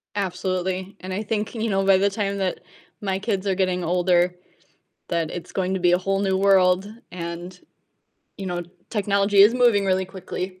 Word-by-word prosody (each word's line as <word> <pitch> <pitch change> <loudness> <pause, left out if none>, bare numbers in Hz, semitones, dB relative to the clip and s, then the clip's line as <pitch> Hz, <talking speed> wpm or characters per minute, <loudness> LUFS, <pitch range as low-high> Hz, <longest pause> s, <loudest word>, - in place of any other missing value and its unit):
Absolutely, 185 0 -2
and 185 0 -5
I 205 +3 -2
think, 215 +1 -2
you 225 0 -2
know, 195 -1 +1
by 195 -1 +6
the 200 +1 +2
time 200 -1 -2
that 190 -2 -2 0.4
my 190 -2 -1
kids 205 -2 -2
are 195 - +1
getting 185 -1 0
older, 180 +1 +2 0.7
that 165 -2 -1
it's 175 - -7
going 190 0 -1
to 190 - -2
be 175 0 +4
a 180 - +4
whole 195 +1 -1
new 190 -1 +1
world, 190 -1 +4 0.2
and, 175 +1 -6 0.8
you 195 - -6
know, 175 -1 -2 0.3
technology 200 -1 +1
is 225 +4 +6
moving 235 -5 +4
really 190 0 +1
quickly. 185 0 -6
190 Hz, 180 wpm, -23 LUFS, 180-200 Hz, 0.8 s, by